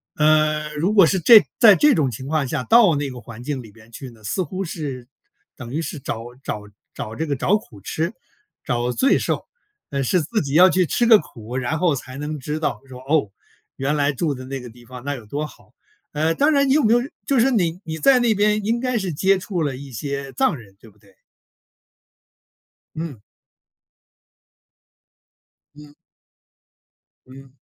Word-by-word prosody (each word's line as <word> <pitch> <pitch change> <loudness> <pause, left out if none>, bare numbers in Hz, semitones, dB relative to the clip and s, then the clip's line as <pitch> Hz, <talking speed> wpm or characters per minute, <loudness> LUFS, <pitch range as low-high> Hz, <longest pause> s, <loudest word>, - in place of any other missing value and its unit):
呃， 155 0 +2
如 165 +7 0
果 195 -4 +8
是 185 +4 +1
这 215 +6 +8 0.2
在 215 -4 +8
这 295 +7 +4
种 145 -5 +1
情 125 +2 -7
况 150 -2 0
下 130 0 -2
到 220 - +5
那 140 -1 -2
个 125 - -9
环 115 0 -11
境 135 -1 -3
里 110 -3 -14
边 115 +1 -19
去 130 +2 -9
呢， 115 -2 -18
似 105 - -2
乎 185 +3 -4
是 140 -7 -6 0.5
等 120 -3 -9
于 150 - -2
是 160 -2 -5
找 115 -4 -5 0.2
找 105 -5 -4 0.3
找 110 - -6
这 160 - -3
个 145 - -1
找 180 +9 +2
苦 110 - -15
吃、 160 - -2 0.5
找 120 0 -1
罪 265 - +2
受， - - -2 0.5
呃， 140 -1 -1
是 165 +7 +1
自 215 +8 -1
己 140 -1 -3
要 180 +3 +8
去 185 -2 +2
吃 240 - +1
个 225 -2 +7
苦。 120 -5 -10
然 130 +3 -1
后 170 -1 +2
才 130 -1 -7
能 150 +1 -5
知 150 +3 -4
道 155 - -2
说： 130 -1 -11
“哦， 145 -8 +2 0.5
原 140 +3 -1
来 145 -1 +2
住 150 +2 -1
的 130 -1 -8
那 135 +1 -5
个 125 -1 -10
地 120 +1 -18
方， 125 0 -10
那 145 +1 -2
有 120 - -10
多 145 +7 -3
好。 - - -15 0.4
“呃， 160 +2 0
当 290 +2 +3
然 280 -2 +3
你 - - +4
有 305 - +3
没 220 - +3
有 240 - +4 0.3
就 275 -3 +2
是 265 +4 +3
你 180 -7 0
你 160 0 -5
在 250 - +5
那 235 -3 +2
边 210 0 +1
应 230 +3 0
该 255 -1 0
是 190 -5 -3
接 190 +6 +2
触 185 -2 -4
了 140 -3 -2
一 135 -1 -10
些 140 +3 -5
藏 135 - +1
人， 100 -5 -16
对 115 - -16
不 105 - -26
对？ - - -24 1.8
嗯。 155 -7 -6 2.6
嗯。 150 0 -15 1.3
嗯。 135 0 -15
150 Hz, 210 characters per minute, -21 LUFS, 130-185 Hz, 2.6 s, 果